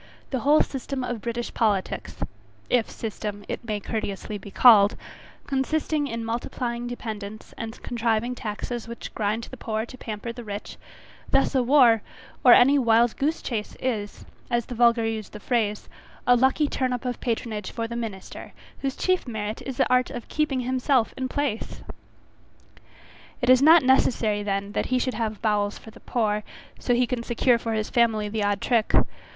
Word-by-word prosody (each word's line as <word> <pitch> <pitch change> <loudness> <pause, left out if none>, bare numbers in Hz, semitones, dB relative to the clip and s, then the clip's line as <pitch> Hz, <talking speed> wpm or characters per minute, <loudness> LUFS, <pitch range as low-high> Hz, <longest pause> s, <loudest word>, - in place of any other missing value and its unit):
The 260 - 0
whole 290 +4 +5
system 270 0 -4
of 245 -3 -3
British 235 +1 -4
politics, 205 -4 -1 0.6
if 240 -3 +2
system 205 -2 -5
it - - -4
may 215 -3 -2
courteously 205 0 -4
be 200 - -10
called, 205 -1 +7 0.5
consisting 290 +2 0
in 230 -3 -4
multiplying 235 +1 -3
dependents 215 -3 -7
and 225 0 -7
contriving 235 0 0
taxes 230 +1 -5
which 235 0 -8
grind 215 +2 -1
the 260 - -9
poor 220 -1 -2
to 255 - -12
pamper 220 +1 -5
the 240 - -8
rich; 205 -1 -7 0.5
thus 270 - +3
a 265 - +3
war, 245 -4 +5 0.4
or 250 - +8
any 275 +3 +6
wild 235 -1 +3
goose 305 +4 -1
chace 220 -4 -4
is, 215 -5 -3 0.2
as 240 -1 0
the - - -7
vulgar 235 -1 +4
use 220 -2 -3
the 210 - -10
phrase, 210 -2 -1 0.4
a 245 - +6
lucky 265 +4 +3
turn 255 -2 -1
up 250 +1 -4
of 245 -1 -3
patronage 220 -4 -2
for 230 -1 -3
the 235 - -6
minister, 220 -5 -6 0.3
whose 270 -1 -2
chief 370 -6 0
merit 215 -2 -4
is 265 - -5
the 265 - +3
art 250 0 +3
of 240 - -7
keeping 300 -4 0
himself 255 -1 +1
in 260 -1 -2
place. 285 -6 -3 1.6
It 245 0 +3
is 255 0 +6
not 320 +2 +7
necessary 230 -5 +3
then 200 0 -2
that - - -1
he 255 - +1
should 255 0 -1
have 220 -2 -3
bowels 205 -2 +1
for 220 - -13
the - - -15
poor, 210 -3 -1 0.4
so 245 - +1
he 250 +1 +3
can 245 -1 -2
secure 240 0 +2
for 225 0 -3
his 215 -1 -2
family 225 -3 +2
the 215 0 -1
odd 205 -1 0
trick. 230 -3 +2
235 Hz, 175 wpm, -25 LUFS, 215-255 Hz, 1.6 s, or